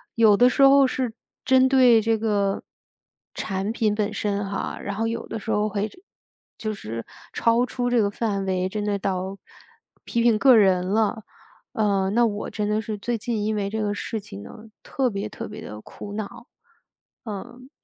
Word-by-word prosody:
有 220 Hz, -3 st, +6 dB
的 245 Hz, -, +6 dB
时 255 Hz, -, +1 dB
候 275 Hz, 0 st, +7 dB
是 255 Hz, -3 st, -2 dB, 0.3 s
针 260 Hz, 0 st, +5 dB
对 255 Hz, -4 st, +6 dB
这 225 Hz, -1 st, +1 dB
个 205 Hz, -3 st, 0 dB, 0.7 s
产 195 Hz, +1 st, -3 dB
品 215 Hz, -2 st, +1 dB
本 210 Hz, 0 st, -1 dB
身 205 Hz, -1 st, -1 dB
哈， 195 Hz, 0 st, -4 dB
然 200 Hz, 0 st, -4 dB
后 225 Hz, +2 st, -1 dB
有 230 Hz, 0 st, -3 dB
的 225 Hz, -, -5 dB
时 220 Hz, -, -9 dB
候 210 Hz, 0 st, +2 dB
会 205 Hz, 0 st, -1 dB
这 290 Hz, -, -17 dB, 0.6 s
就 215 Hz, -1 st, -3 dB
是 115 Hz, -, -6 dB, 0.3 s
超 235 Hz, +1 st, +3 dB
出 245 Hz, -1 st, -2 dB
这 245 Hz, -2 st, +3 dB
个 200 Hz, -, +2 dB
范 205 Hz, -3 st, -2 dB
围， 185 Hz, 0 st, 0 dB
真 210 Hz, +1 st, -3 dB
的 205 Hz, -1 st, 0 dB
到 190 Hz, 0 st, -2 dB, 0.7 s
批 235 Hz, -, -1 dB
评 230 Hz, -2 st, +4 dB
个 260 Hz, +2 st, +6 dB
人 190 Hz, -4 st, +4 dB
了。 220 Hz, +2 st, 0 dB, 0.5 s
呃， 200 Hz, -4 st, +1 dB
那 235 Hz, +3 st, +4 dB
我 210 Hz, -2 st, -2 dB
真 210 Hz, -1 st, -2 dB
的 215 Hz, +1 st, +1 dB
是 220 Hz, -2 st, -5 dB
最 235 Hz, +3 st, -2 dB
近 220 Hz, -1 st, -2 dB
因 215 Hz, +1 st, 0 dB
为 200 Hz, -1 st, -1 dB
这 220 Hz, +1 st, -2 dB
个 205 Hz, -1 st, 0 dB
事 220 Hz, +2 st, -4 dB
情 100 Hz, -, -10 dB
呢， 215 Hz, -, -12 dB, 0.2 s
特 265 Hz, -2 st, 0 dB
别 200 Hz, 0 st, -3 dB
特 -, -, -7 dB
别 210 Hz, -, -9 dB
地 105 Hz, +1 st, -8 dB
苦 205 Hz, -, -9 dB
恼， 210 Hz, -1 st, -6 dB, 0.8 s
嗯。 240 Hz, +5 st, -8 dB
215 Hz, 205 characters per minute, -24 LUFS, 200-230 Hz, 0.8 s, 候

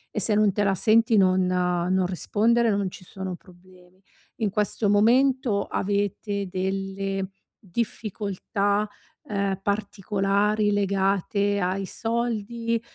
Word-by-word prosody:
e -, -, +1 dB
se 215 Hz, -, +5 dB
non 210 Hz, -1 st, +4 dB
te 205 Hz, +2 st, 0 dB
la 195 Hz, -1 st, +2 dB
senti 225 Hz, +3 st, +3 dB
non 185 Hz, -2 st, +4 dB
non 180 Hz, 0 st, +1 dB
rispondere, 225 Hz, +5 st, +2 dB
non 200 Hz, -2 st, 0 dB
ci 185 Hz, -, -12 dB
sono 190 Hz, 0 st, -6 dB
problemi. 180 Hz, +1 st, -20 dB, 0.4 s
In 220 Hz, -4 st, 0 dB
questo 210 Hz, +1 st, 0 dB
momento 235 Hz, 0 st, +3 dB
avete 200 Hz, 0 st, -2 dB
delle 195 Hz, +1 st, -3 dB, 0.3 s
difficoltà, 205 Hz, 0 st, -2 dB, 0.4 s
ehm, 200 Hz, -2 st, -2 dB
particolari 205 Hz, +1 st, 0 dB
legate 200 Hz, 0 st, +1 dB
ai 190 Hz, +2 st, -1 dB
soldi, 230 Hz, +1 st, -2 dB
200 Hz, 110 wpm, -25 LUFS, 190-215 Hz, 0.4 s, se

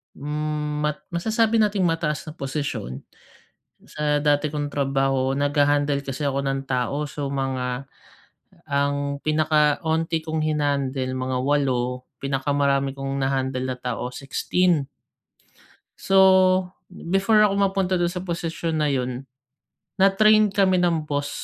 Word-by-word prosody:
mat 150 Hz, 0 st, -3 dB
masasabi 220 Hz, +5 st, +1 dB
nating 205 Hz, -3 st, +1 dB
mataas 165 Hz, -2 st, -2 dB
na 155 Hz, -, -6 dB
posisyon 135 Hz, -, -4 dB, 0.9 s
sa 150 Hz, -1 st, 0 dB
dati 145 Hz, 0 st, +2 dB
kong 145 Hz, -1 st, -2 dB
trabaho. 135 Hz, -1 st, +1 dB
Nagha-handle 145 Hz, 0 st, +1 dB
kasi 135 Hz, +2 st, -3 dB
ako 140 Hz, 0 st, -1 dB
ng 135 Hz, 0 st, -2 dB
tao. 130 Hz, +4 st, -1 dB
So, 145 Hz, 0 st, -5 dB
mga 135 Hz, -1 st, -3 dB, 0.8 s
ang 140 Hz, 0 st, 0 dB
pinaka 155 Hz, -1 st, +2 dB
onti 160 Hz, 0 st, 0 dB
kong 160 Hz, 0 st, -3 dB
hina-handle, 140 Hz, -4 st, -1 dB
mga 130 Hz, 0 st, -2 dB
8, 130 Hz, -3 st, 0 dB, 0.2 s
pinakamarami 140 Hz, 0 st, 0 dB
kong 135 Hz, 0 st, -3 dB
na-handle 130 Hz, -1 st, -1 dB
na 130 Hz, -1 st, -3 dB
tao, 125 Hz, 0 st, -3 dB
16. 145 Hz, +3 st, 0 dB, 1.1 s
So, 195 Hz, -, +1 dB, 0.7 s
before 195 Hz, +5 st, +1 dB
ako 195 Hz, -, +1 dB
mapunta 195 Hz, -2 st, +1 dB
dun 175 Hz, 0 st, +1 dB
sa 180 Hz, -, -4 dB
posisyon 165 Hz, -2 st, -3 dB
na 150 Hz, -, +2 dB
yun, 130 Hz, 0 st, -3 dB, 0.7 s
na-train 215 Hz, +2 st, +5 dB
kami 190 Hz, -2 st, +3 dB
ng 170 Hz, -3 st, +1 dB
boss 145 Hz, -1 st, -2 dB
145 Hz, 120 wpm, -23 LUFS, 135-165 Hz, 1.1 s, na-train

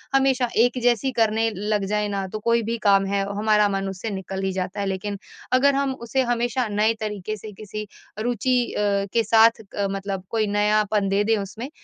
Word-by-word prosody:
हमेशा 265 Hz, -2 st, +3 dB
एक 245 Hz, +2 st, +3 dB
जैसी 245 Hz, +2 st, +2 dB
करने 225 Hz, 0 st, +2 dB
लग 210 Hz, 0 st, -1 dB
जाएँ 210 Hz, +1 st, 0 dB
ना 200 Hz, -1 st, -2 dB
तो 215 Hz, +3 st, -6 dB
कोई 235 Hz, +2 st, +2 dB
भी 230 Hz, +2 st, -2 dB
काम 195 Hz, -2 st, +4 dB
है, 200 Hz, 0 st, 0 dB
हमारा 210 Hz, -1 st, +3 dB
मन 195 Hz, -1 st, -2 dB
उससे 190 Hz, +4 st, -5 dB
निकल 190 Hz, 0 st, -5 dB
ही 190 Hz, -, 0 dB
जाता 185 Hz, +2 st, -3 dB
है। -, -, -1 dB
लेकिन 195 Hz, +1 st, -3 dB, 0.3 s
अगर 275 Hz, +2 st, +4 dB
हम 275 Hz, -1 st, 0 dB
उसे 265 Hz, +3 st, +1 dB
हमेशा 240 Hz, +1 st, 0 dB
नए 210 Hz, +2 st, +2 dB
तरीके 210 Hz, 0 st, -4 dB
से 215 Hz, +2 st, -9 dB
किसी 210 Hz, +1 st, -7 dB, 0.3 s
रुचि 245 Hz, +2 st, +1 dB
अ, -, -, -3 dB, 0.3 s
के 230 Hz, -, +3 dB
साथ 225 Hz, 0 st, +5 dB
क 200 Hz, -1 st, 0 dB
मतलब 195 Hz, -1 st, -4 dB
कोई 220 Hz, -2 st, +1 dB
नयापन 210 Hz, 0 st, +1 dB
दे 200 Hz, +1 st, +2 dB
दें 225 Hz, +1 st, +2 dB
उसमें, 215 Hz, +6 st, -6 dB
215 Hz, 200 wpm, -23 LUFS, 200-230 Hz, 0.3 s, साथ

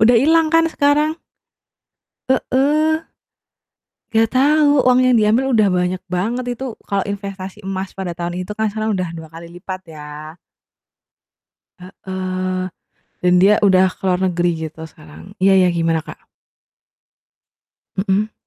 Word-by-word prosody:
Udah 235 Hz, +2 st, +6 dB
ilang 320 Hz, +5 st, +4 dB
kan 330 Hz, 0 st, +4 dB
sekarang? 300 Hz, +1 st, +1 dB, 1.1 s
Heeh. 300 Hz, +5 st, +1 dB, 1.1 s
Nggak 225 Hz, 0 st, +3 dB
tahu, 290 Hz, +2 st, +4 dB
uang 250 Hz, 0 st, +4 dB
yang 250 Hz, -1 st, +4 dB
diambil 220 Hz, +4 st, +3 dB
udah 215 Hz, -2 st, +4 dB
banyak 180 Hz, 0 st, -1 dB
banget 230 Hz, +8 st, -1 dB
itu, 260 Hz, -4 st, -5 dB
kalau 200 Hz, -1 st, -1 dB
investasi 200 Hz, 0 st, -6 dB
emas 190 Hz, 0 st, -5 dB
pada 190 Hz, -2 st, -4 dB
tahun 175 Hz, +1 st, -4 dB
itu 195 Hz, -, -8 dB
kan 220 Hz, 0 st, +1 dB
sekarang 215 Hz, +1 st, -2 dB
udah 180 Hz, -2 st, -2 dB
2 160 Hz, -1 st, -9 dB
kali 165 Hz, +1 st, -10 dB
lipat, 185 Hz, +2 st, -7 dB, 0.2 s
ya. 150 Hz, +2 st, -9 dB, 1.5 s
Heeh, 185 Hz, 0 st, -4 dB, 0.6 s
dan 180 Hz, 0 st, +3 dB
dia 205 Hz, +2 st, +6 dB
udah 190 Hz, -1 st, +5 dB
ke -, -, -32 dB
luar 180 Hz, 0 st, +1 dB
negeri 175 Hz, -1 st, +1 dB, 0.2 s
gitu 160 Hz, +1 st, -11 dB
sekarang. 80 Hz, +1 st, -15 dB, 0.2 s
Iya 195 Hz, 0 st, +5 dB
iya, -, -, +3 dB
gimana, 165 Hz, -1 st, +1 dB
Kak? -, -, -12 dB, 1.7 s
Mhm. 200 Hz, +2 st, 0 dB
195 Hz, 135 wpm, -19 LUFS, 180-245 Hz, 1.7 s, Udah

